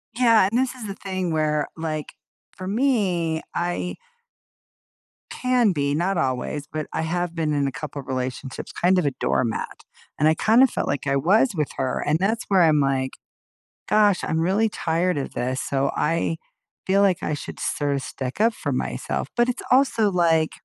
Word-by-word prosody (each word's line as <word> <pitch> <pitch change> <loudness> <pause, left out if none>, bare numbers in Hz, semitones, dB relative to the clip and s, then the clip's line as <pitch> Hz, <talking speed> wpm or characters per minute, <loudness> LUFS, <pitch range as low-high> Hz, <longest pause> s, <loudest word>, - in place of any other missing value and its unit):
Yeah, 230 -5 +5
and 235 - +2
this 260 -1 0
is 235 -4 -7
the 195 - -5
thing 185 -3 -3
where, 150 -2 +1
like, 155 -2 -4 0.4
for 185 - -7
me, 190 -9 +1
I 175 +1 -2 1.3
can 250 -4 +2
be, 140 -2 0
not 175 +5 0
always, 135 +1 -2
but 155 -1 -4
I - - -2
have 175 +1 -2
been 155 -2 0
in 140 -1 +1
a - - -2
couple 145 +1 -6
relationships 130 0 -5
kind 185 +2 +2
of 180 - +2
a 140 - +2
doormat, 120 -3 -2 0.3
and 150 - +3
I 160 - +5
kinda 225 +10 +5
felt - - -3
like 140 0 -2
I 140 - +2
was 195 - +4
with 150 -3 -1
her, 130 -1 -1
and 150 +2 +2
that's 220 +4 0
where 190 -3 +4
I'm 155 -2 +4
like, 135 -1 +1 0.8
"Gosh, 205 -3 +3
I'm 160 - 0
really 195 +7 +2
tired 170 -2 0
of 140 - -4
this," 130 +2 -2
so 135 0 0
I 165 +1 0 0.5
feel 195 +1 +4
like 190 -3 +3
I 150 - -1
should 145 - -6
sort 145 -1 -1
of 135 - -2
stick 130 +2 -6
up 230 +1 +4
for - - -4
myself, - - -2
but 240 +1 +3
it's 250 - -2
also 255 -5 +4
like, 165 -3 +2
165 Hz, 185 wpm, -23 LUFS, 145-200 Hz, 1.3 s, Yeah